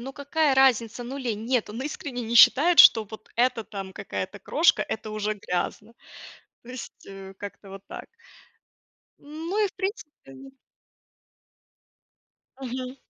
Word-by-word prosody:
ну 265 +3 -7
какая 285 +1 0
разница, 245 -3 +2
ну 250 +3 -7
или 255 -4 -2
нет. 225 +2 -2
Он 225 +4 -7
искренне 280 -3 -5
не 230 +1 -4
считает, 325 +8 +6
что 220 -1 +8
вот 215 +1 -13
эта 235 -2 +1
там 195 -2 -8
какая-то - - -6
крошка- 330 - +2
это 220 -3 -5
уже 215 0 -2
грязно. 205 +3 -4 0.7
То 240 - -14
есть, 255 -1 -10
э, 195 0 -10
как-то 200 0 -10
вот 195 0 -10
так. - - -9 1.1
Ну, 325 +8 -3
и - - 0
в - - -18
принципе 385 -4 -4 0.2
н 270 0 -13 2.1
Мгм. 255 +1 -6
245 Hz, 140 wpm, -25 LUFS, 215-280 Hz, 2.1 s, что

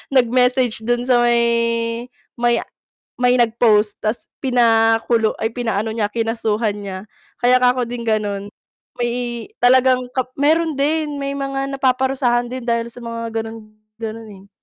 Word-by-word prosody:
nag-message 250 -1 +3
dun 240 0 +1
sa 250 -1 +3
may 235 0 +1 0.3
may 240 -1 +2 0.6
may 250 0 +4
nag-post 220 -3 +3
tas 215 +2 -2 0.2
pina 230 -3 +4
kulu 225 -2 +2
ay 225 - +1
pinaano 225 -3 -1
niya 210 -2 -1
kinasuhan 225 -2 -1
niya. 195 -2 -6 0.4
Kaya 250 +1 +5
'kako 250 0 +3
din 240 -1 -5
ganon, 205 -2 -1 0.5
may 240 -1 -2 0.2
talagang 255 0 +4
kap 255 -1 -1
meron 320 +3 +2
din, 300 +1 0
may 275 0 -2
mga 275 0 -3
napaparusahan 260 -2 +1
din 255 - -4
dahil 235 -1 0
sa 235 - -10
mga 230 -1 -5
ganon-ganon, 220 0 -9
eh. 195 0 -15
235 Hz, 135 wpm, -19 LUFS, 225-250 Hz, 0.6 s, Kaya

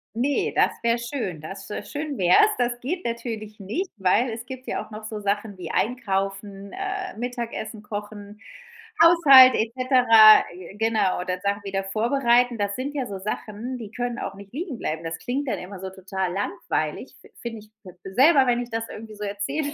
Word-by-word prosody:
Ne, 270 +4 0
das - - +4
wär 235 0 +2
schön. 235 - -4
Das 195 +5 -8 0.3
schön 290 -1 -4
wär's. 195 - +5
Das 240 0 0
geht 345 +8 -3
natürlich 225 -3 -5
nicht, 320 - -3
weil 210 +6 +2
es 230 +1 -6
gibt 260 0 -9
ja - - -3
auch - - -21
noch 215 0 -8
so 215 -1 -5
Sachen 205 0 -2
wie 175 -3 -6
Einkaufen, 195 -3 -2
äh, 390 - -5
Mittagessen 235 -2 -5
kochen, 205 0 -8 0.6
Haushalt 275 -7 +8
et 225 +1 -1
cetera, 245 -4 +7
g 185 +2 -11
genau 220 -3 +1
oder 180 0 -3
Sachen 200 +1 -1
wieder 195 -1 -2
vorbereiten. 240 +2 +2
Das 200 0 -1
sind 275 +3 -4
ja 265 -4 -3
so 195 - -6
Sachen, 215 +5 -5
die 220 - -8
können 245 0 -3
auch 195 - -5
nicht 200 +1 -13
liegen 305 -2 -5
bleiben. 160 -5 -4
Das 165 0 -4
klingt 270 - -3
dann - - -1
immer 185 +1 -9
so 190 - -6
total 190 -1 -4
langweilig, 195 - -3
find - - -20
find 225 -3 -7
ich 215 - -28 0.4
selber, 275 - +6
wenn 245 -1 +1
ich 245 - -7
das 225 0 -3
irgendwo 220 0 -9
so 210 - -7
erzähle. 205 +9 -3
225 Hz, 185 wpm, -24 LUFS, 200-250 Hz, 0.6 s, Haushalt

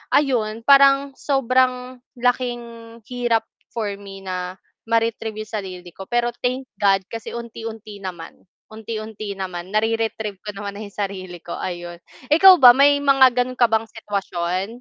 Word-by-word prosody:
ayun, 230 -6 +1
parang 275 0 +5
sobrang 255 -1 +1 0.2
laking 245 0 0 0.5
hirap 240 -3 0 0.3
for 220 -3 -2
me 195 -1 -11
na 185 -1 -4 0.3
ma-retrieve 225 -1 -1
'yong 215 +1 -8
sarili 180 -2 -8
ko, 190 +2 -10
pero 240 0 0
thank 255 +2 -1 0.2
God 195 -1 +3
kasi 225 -1 -6
unti-unti 225 -3 -8
naman, 180 -4 -8 0.3
unti-unti 215 -1 -6
naman 185 -1 -6
nare-retrieve 220 -2 -1
ko 210 - -6
naman 200 0 -6
na - - -8
'yong 200 - -11
sarili 185 -3 -5
ko. 170 - -6
Ayon, 175 -1 -6 0.3
ikaw 375 +4 +9
ba 250 -2 +11
may 285 +1 +6
mga 270 -2 +6
gano'n 255 +1 -3
ka 240 - +6
bang 225 0 0
sitwasyon? 190 -4 -3
220 Hz, 145 wpm, -21 LUFS, 195-245 Hz, 0.5 s, ba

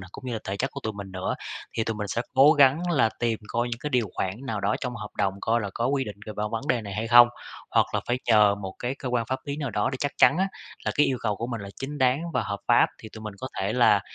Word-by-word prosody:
này, 90 - -10
cũng 130 - -11
như 125 - -3
là 115 - -2
thể 100 - -3
chất 135 +7 -1
của 140 - -7
tụi 110 - -2
mình 100 -2 -8
nữa. 95 0 -2 0.4
Thì 115 - +1
tụi 115 - -2
mình 105 -1 -3
sẽ 115 - -1
cố 135 +3 +7
gắng 150 +4 +4
là 135 -8 +4
tìm 115 -2 0
coi 120 +2 -1
những 120 -1 -4
cái 150 - -3
điều 125 -4 +2
khoản 95 - -1 0.2
nào 110 -4 -2
đó 100 +2 +1
trong 125 -2 -3
hợp 105 -3 -6
đồng 95 -1 +1
coi 115 +1 +1
là 100 -2 -4
có 115 - 0
quy 135 0 +1
định 105 -2 -7
về 110 - -5
vân 105 - -1
vấn 115 0 -3
đề 125 -7 +2
này 100 -2 -7
hay 110 +2 -2
không? 120 0 +9 0.4
Hoặc - - +4
là - - +2
phải 120 +1 0
nhờ 105 -3 +6
một 95 -2 -6
cái 125 +2 -2
cơ 130 - -4
quan 120 -2 0
pháp 130 +2 -2
lý 140 0 -4
nào 145 -4 -3
đó 105 +2 0
để 130 - -3
chắc 145 - -1
chắn 135 +6 +6
á, 190 +1 +2 0.4
là - - 0
cái 145 - +4
yêu 130 - 0
cầu 105 -3 0
của 115 - -3
mình 120 -3 -4
là 100 - -7
chính 145 +2 -5
đáng 130 +2 +3
và - - +1
hợp 100 -1 -4
pháp, - - +6
thì 110 - -10
tụi 110 - -9
mình 105 -2 -6
có 130 - -5
thể 100 +2 0
là, 120 -4 +5
120 Hz, 315 wpm, -26 LUFS, 105-130 Hz, 0.4 s, không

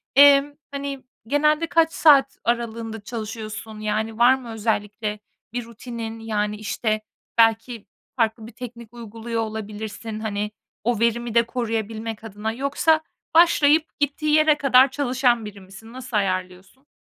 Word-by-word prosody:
emm, 285 0 +7 0.2
hani, 280 -1 -5 0.2
genelde 300 +4 +2
kaç 330 0 +3
saat 275 -3 +5
aralığında 230 -2 -2
çalışıyorsun? 220 -1 -6
Yani, 215 +1 -2
var 245 +2 +6
mı 255 -3 -9
özellikle 210 -1 -2 0.3
bir 245 -1 -3
rutinin, 230 -1 -7
yani, 210 -2 -2
işte, 215 +1 -2 0.4
belki 225 0 +2 0.3
farklı 225 -2 0
bir - - -11
teknik 240 -2 -10
uyguluyor 230 0 -5
olabilirsin, 215 0 -6
hani, 210 -1 -3 0.3
o 235 -1 0
verimi 235 0 0
de 235 - +6
koruyabilmek 225 -2 -3
adına. 220 0 -4
Yoksa 280 +6 +1 0.3
başlayıp 320 -2 +4
gittiği 295 +1 0
yere 310 -1 +4
kadar 265 -2 +5
çalışan 250 -4 +1
biri 205 -1 -9
misin? 195 +5 -13
Nasıl 250 -4 -4
ayarlıyorsun? 185 +6 -3
230 Hz, 130 wpm, -23 LUFS, 215-260 Hz, 0.4 s, emm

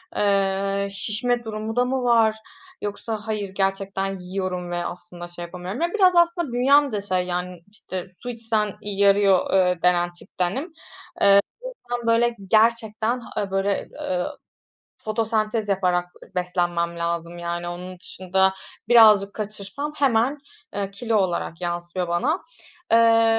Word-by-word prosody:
eee, 195 0 +1
şişme 235 +4 -1
durumu 220 0 -5
da 245 0 +3
mı 260 0 -1
var 225 -3 +4 0.5
yoksa 210 +2 -4
hayır 210 -2 -2
gerçekten 195 0 -2
yiyorum 180 -1 -4
ve - - -2
aslında, 175 0 -8
şey, 175 0 -8
yapamıyorum. 180 - -6
Ya, 340 - +3
biraz 375 -4 +4
aslında 345 -4 +3
bünyem 280 +3 +4
de 210 -2 -2
şey 185 -2 0
yani, 180 -1 -4
işte 185 -4 -7 0.2
su 245 - -4
içsen, 225 -3 -1
iii, 205 -1 -2
yarıyor, 200 -2 +4
eee, 180 -2 +3
denen 175 0 +3
tiptenim. 190 - -4 0.5
Eee, 200 0 +7 0.5
o 245 - 0
yüzden 240 -1 -8
böyle 235 +1 +3
gerçekten, 225 +1 +2
ha, 230 - -12
aaa, 200 - -1
böyle, 195 +1 0
ııı, 180 -1 -2 0.7
fotosentez 215 0 -1
yaparak, 180 -2 +1 0.2
ııı, - - -22
beslenmem 175 -1 -1
lazım 170 0 -3
yani 175 0 -3
onun 180 +1 -7
dışında 190 +2 0 0.3
birazcık 215 -4 +6
kaçırsam 215 +7 -5
hemen, 270 0 +2 0.4
eee, 200 -1 -2
kilo 220 +3 -1
olarak 180 -3 -1
yansıyor 175 0 -3
bana. 260 - 0 0.5
Eee 230 0 +5
200 Hz, 140 wpm, -23 LUFS, 180-230 Hz, 0.7 s, Eee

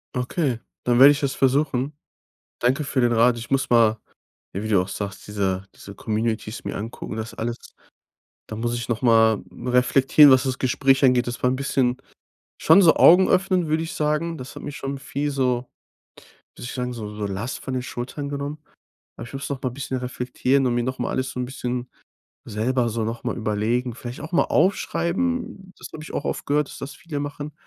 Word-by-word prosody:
Okay, 125 0 -1 0.3
dann 120 -1 +3
werde 140 +2 +10
ich 145 - 0
das 140 -2 -1
versuchen. 135 0 +1 0.7
Danke 130 +5 +1
für 140 -2 -1
den 120 -1 +3
Rat. 115 +1 +4
Ich 115 - -9
muss 135 -1 +1
mal 115 -2 +4 0.5
wie 105 +4 -4
du 100 -4 +4
auch 90 - -3
sagst, 100 -1 -6
diese 95 -2 -1
diese 100 - -11
Communities 110 +1 -3
mir - - -4
angucken, 110 +1 -6
das 110 0 -5
alles. 115 +1 -3 0.9
Da 110 - -6
muss 120 +2 -2
ich 120 -1 -4
noch 120 0 -2
mal 110 -3 +4
reflektieren, 130 +6 +5
was 130 0 +5
das 130 -1 -2
Gespräch 135 +1 +2
angeht. 125 -2 +4
Das 120 - -6
war 125 - +3
'n - - 0
bisschen 130 -2 0 0.6
schon 200 - +6
so 165 -3 +6
Augen 185 +3 +7
öffnend, 185 -2 +2
würde 155 +1 +1
ich 165 +3 -6
sagen. 150 +2 -1
Das 130 -3 -9
hat - - -8
mich 145 - -6
schon 135 0 -4
viel 140 +2 -3
so 130 -3 0 0.9
würde - - -11
ich 125 - -5
sagen, 125 -1 -3
so 105 -3 -6
so 105 -1 -3
Last 100 +6 -4
von 130 - -6
den 130 -1 -2
Schultern 130 +4 -5
genommen. 140 +1 -4 0.6
Aber 115 - -7
ich - - -14
muss 135 0 -5
noch 140 -2 -4
mal 130 - -1
bisschen 130 0 -4
reflektieren 125 +2 0
und 120 - 0
mir 120 - +1
noch 130 +1 -3
mal - - -1
alles 130 0 -2
so - - -6
'n 125 - -1
bisschen 125 -1 -4 0.6
selber 120 +3 0
so 115 +1 -2
noch 115 +1 -5
mal - - -2
überlegen, 115 +3 -1
vielleicht 120 +2 -8
auch 160 - -7
mal 175 - +4
aufschreiben, 195 +2 0
das - - -9
habe 155 - -8
ich - - -10
auch 145 - -3
oft - - -3
gehört, 145 0 +1
dass - - -10
das 140 +1 -7
viele 160 -3 -6
machen, 145 +1 -5
125 Hz, 205 wpm, -23 LUFS, 115-140 Hz, 0.9 s, werde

